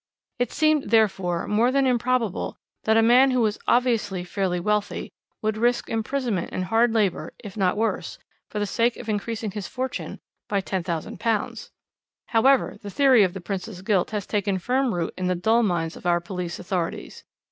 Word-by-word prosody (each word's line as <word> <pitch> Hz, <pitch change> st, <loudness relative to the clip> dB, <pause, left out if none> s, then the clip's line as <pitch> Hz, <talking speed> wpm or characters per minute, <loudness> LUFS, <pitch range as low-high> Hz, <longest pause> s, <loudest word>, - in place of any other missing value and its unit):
It 245 Hz, -2 st, 0 dB
seemed, 310 Hz, -2 st, +2 dB
therefore, 190 Hz, -6 st, +2 dB
more 225 Hz, +4 st, +3 dB
than 275 Hz, 0 st, +2 dB
improbable 245 Hz, -4 st, 0 dB, 0.3 s
that 220 Hz, 0 st, +4 dB
a 225 Hz, -, +5 dB
man 250 Hz, +4 st, +6 dB
who 255 Hz, -1 st, +2 dB
was 215 Hz, -2 st, 0 dB
obviously 225 Hz, -7 st, +1 dB
fairly 180 Hz, -1 st, -1 dB
wealthy 210 Hz, +3 st, -1 dB, 0.3 s
would 215 Hz, 0 st, 0 dB
risk 240 Hz, +2 st, +1 dB
imprisonment 225 Hz, -4 st, -1 dB
and 185 Hz, -, -2 dB
hard 225 Hz, +5 st, +3 dB
labour, 200 Hz, -8 st, 0 dB
if 200 Hz, -2 st, -8 dB
not 195 Hz, -1 st, +1 dB
worse, 225 Hz, +1 st, -1 dB, 0.3 s
for -, -, -6 dB
the 205 Hz, -, 0 dB
sake 230 Hz, +4 st, +1 dB
of 230 Hz, -, -8 dB
increasing 215 Hz, 0 st, -2 dB
his 205 Hz, -1 st, -5 dB
fortune 260 Hz, 0 st, -4 dB, 0.3 s
by 200 Hz, -, +1 dB
£10,000. 190 Hz, +4 st, -2 dB, 0.6 s
"However, 260 Hz, +2 st, +3 dB
the 205 Hz, -, -7 dB
theory 265 Hz, +1 st, +5 dB
of 185 Hz, -2 st, +2 dB
the 190 Hz, -, -5 dB
Prince's 190 Hz, +1 st, -5 dB
guilt 190 Hz, -3 st, +1 dB
has 210 Hz, -2 st, -3 dB
taken 200 Hz, -2 st, 0 dB
firm 255 Hz, +6 st, 0 dB
root 170 Hz, -1 st, -2 dB
in 185 Hz, 0 st, -2 dB
the 180 Hz, -, +1 dB
dull 220 Hz, +7 st, +3 dB
minds 175 Hz, -6 st, 0 dB
of -, -, -6 dB
our 175 Hz, 0 st, +3 dB
police 175 Hz, 0 st, -5 dB
authorities. 175 Hz, -2 st, -4 dB
210 Hz, 175 wpm, -24 LUFS, 185-235 Hz, 0.6 s, man